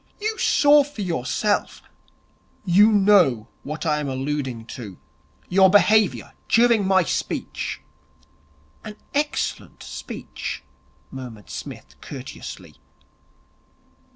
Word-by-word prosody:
You 435 +1 -3
saw 290 0 +5
for 275 -7 -7
yourself 175 - -1 0.4
' - - -37
'You 205 +4 +5
know 190 - +4
what 155 +2 -6
I 150 -2 +1
am 145 -2 -3
alluding 130 -3 -3
to. 105 -7 -9 0.5
Your 190 +1 +5
behaviour 210 +1 +3 0.2
during 230 -4 +4
my 190 -1 +4
speech.' - - -3 1.0
'An 210 - -8 0.2
excellent 295 +1 -2
speech,' - - -7 0.5
murmured 120 - -9
Psmith - - -9
courteously. - - -9
190 Hz, 95 wpm, -23 LUFS, 135-215 Hz, 1.0 s, saw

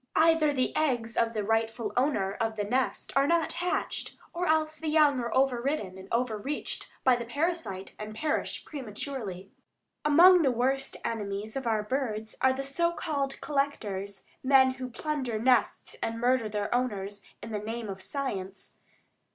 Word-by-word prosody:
Either 325 -2 +5
the 260 -3 0
eggs 240 -7 0
of 230 0 +2
the 215 -2 -1
rightful 225 +2 0
owner 250 -7 +1
of 225 +1 -2
the 210 - -1
nest 250 +5 -1
are 275 +1 +4
not 335 0 +2
hatched, 355 +1 -2 0.2
or 355 +1 -1
else 310 0 +1
the 320 - -4
young 300 -3 +4
are 235 -1 -3
overridden 260 -6 +1
and 190 0 -11
overreached 235 +3 -2
by 255 -1 +6
the 240 - -3
parasite 285 - -2
and 215 0 -6
perish 305 +6 -2
prematurely. 215 - -6 0.5
Among 345 +5 +7
the 280 - +4
worst 265 +3 0
enemies 210 -1 -3
of 265 -3 -3
our 220 -2 +1
birds 220 -3 -2
are 260 - +5
the 265 +1 -2
so 340 +5 +1
called 285 -5 -2
"collectors," 210 -9 -2 0.2
men 265 -1 +5
who 255 -1 -6
plunder 260 -3 -2
nests 240 0 +2
and 225 0 -2
murder 245 -2 +2
their 210 +1 -2
owners 205 -5 -1 0.2
in - - -7
the 210 - -2
name 225 +2 -4
of 190 -1 -6
science. 195 -8 -5
250 Hz, 160 wpm, -29 LUFS, 215-285 Hz, 0.5 s, Among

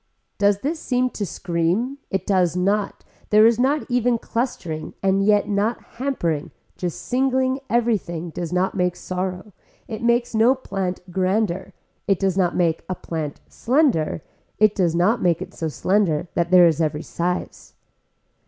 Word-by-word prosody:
Does 200 0 +3
this 310 +4 -2
seem 255 -2 0
to 205 - -4
scream, 175 +13 -1
it 190 -1 -2
does 180 -4 +2
not 200 +3 0 0.3
there 215 +1 +6
is 230 0 +4
not 275 +4 +2
even 245 -1 +2
clustering 220 -10 -4
and 195 0 +2
yet 205 0 +3
not 210 +3 0 0.2
hampering 170 - -1 0.3
not 180 -1 0
singling 260 - 0
everything 200 -8 0
does 170 0 -5
not 180 +1 +1
make 180 -2 0
sorrow, 185 +2 -4 0.3
it 220 0 -6
makes 235 0 +1
no 225 +4 +4
plant 195 -7 -4
grander, 190 0 0 0.3
it 195 - +3
does 190 -1 0
make 175 -3 +1
a 185 - -1
plant 155 -4 -5
slender, 240 - +1 0.3
it 215 -1 +4
does 175 -5 +1
not 210 +7 +2
make 170 -2 +2
it - - -8
so 160 - -3
slender 175 0 +1
that 170 0 0
there 180 -1 +7
is 165 -1 +2
every 155 0 -1
size. 180 +1 -4
195 Hz, 155 wpm, -22 LUFS, 175-235 Hz, 0.3 s, there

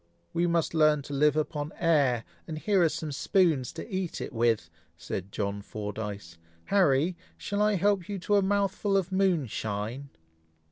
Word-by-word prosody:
"We 170 +1 +2
must 170 -2 +1
learn 155 -2 +4
to 145 - -7
live 150 +1 +3
upon 150 -1 -2
air, 140 -9 +2 0.2
and 160 -2 -5
here 195 +3 +2
are 165 - +5
some 155 0 -4
spoons 155 -3 +2
to 165 - -7
eat 185 -5 -3
it - - -6
with," 115 -6 +1 0.3
said 95 +2 -5
John 100 0 -2
Fordyce. 105 -5 -6 0.3
"Harry! 170 -3 +3 0.2
shall 205 0 -2
I 210 0 +3
help 195 -1 +1
you 200 - -2
to 205 +3 +1
a - - +4
mouthful 200 0 +1
of 190 -1 -1
moonshine?" 135 - -1
155 Hz, 160 wpm, -28 LUFS, 120-190 Hz, 0.3 s, are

